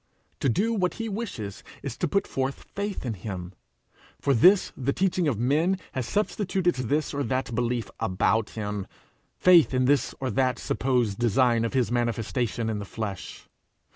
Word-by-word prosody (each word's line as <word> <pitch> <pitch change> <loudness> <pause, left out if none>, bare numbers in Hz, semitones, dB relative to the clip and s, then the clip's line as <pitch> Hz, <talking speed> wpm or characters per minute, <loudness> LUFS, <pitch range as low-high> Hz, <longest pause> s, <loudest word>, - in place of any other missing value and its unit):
To 135 - +2
do 215 - +1
what 185 -5 0
he 225 0 -4
wishes 195 - -5 0.2
is - - -4
to - - 0
put 200 +6 +1
forth 135 +1 -3
faith 200 -6 -3
in 120 - -1
him. 95 -2 -6 0.7
For 140 - +2
this 180 - +5
the 140 +1 -1
teaching 185 -3 +1
of 130 -7 +1
men 150 - +2
has 130 -3 -3
substituted 190 -3 0
this 140 +5 -1
or 145 - -1
that 130 -1 -1
belief 120 0 -1
about 110 +1 +1
him, 105 -2 -3 0.5
faith 175 -7 +6
in 130 0 +3
this 140 +2 +2
or 130 -2 -2
that 130 +2 +1
supposed 120 -6 0
design 120 0 +3
of 115 - -2
his 125 -3 +1
manifestation 115 -1 -1
in 110 -2 -1
the 100 - -5
flesh. 100 -3 -6
130 Hz, 170 wpm, -26 LUFS, 110-165 Hz, 0.7 s, faith